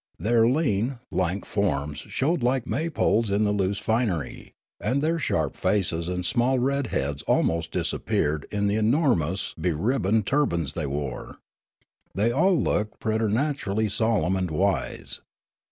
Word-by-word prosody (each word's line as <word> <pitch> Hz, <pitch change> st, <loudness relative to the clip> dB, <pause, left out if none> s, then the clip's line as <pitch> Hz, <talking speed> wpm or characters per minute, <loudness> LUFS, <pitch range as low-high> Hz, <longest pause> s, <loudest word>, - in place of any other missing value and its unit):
Their 115 Hz, +1 st, +3 dB
lean, 125 Hz, -3 st, 0 dB
lank 95 Hz, +2 st, -1 dB
forms 75 Hz, -8 st, -1 dB
showed 155 Hz, +3 st, -1 dB
like 125 Hz, 0 st, +1 dB
May 160 Hz, +4 st, -1 dB
poles 115 Hz, -7 st, +1 dB
in 100 Hz, +2 st, +2 dB
the 105 Hz, -, +2 dB
loose 100 Hz, -1 st, 0 dB
finery; 110 Hz, -, -2 dB, 0.2 s
and 135 Hz, -, 0 dB
their 165 Hz, +3 st, 0 dB
sharp -, -, -1 dB
faces 85 Hz, -5 st, 0 dB
and 90 Hz, 0 st, -2 dB
small 125 Hz, +5 st, +2 dB
red 135 Hz, +1 st, 0 dB
heads 70 Hz, -6 st, -2 dB
almost 80 Hz, 0 st, +1 dB
disap -, -, -2 dB
peared 75 Hz, 0 st, 0 dB
in 105 Hz, -1 st, -1 dB
the 100 Hz, +1 st, +1 dB
enormous 110 Hz, -, +1 dB
beribboned 105 Hz, -, +1 dB
turbans 85 Hz, -, 0 dB
they 80 Hz, -3 st, -3 dB
wore. 70 Hz, -2 st, -5 dB, 0.8 s
They 105 Hz, +5 st, +2 dB
all 175 Hz, +7 st, +3 dB
looked 105 Hz, +1 st, -1 dB
preternaturall}' 110 Hz, -1 st, 0 dB
solemn 105 Hz, -4 st, +1 dB
and 90 Hz, -2 st, -1 dB
wise. 95 Hz, +5 st, -1 dB
105 Hz, 140 wpm, -25 LUFS, 90-125 Hz, 0.8 s, Their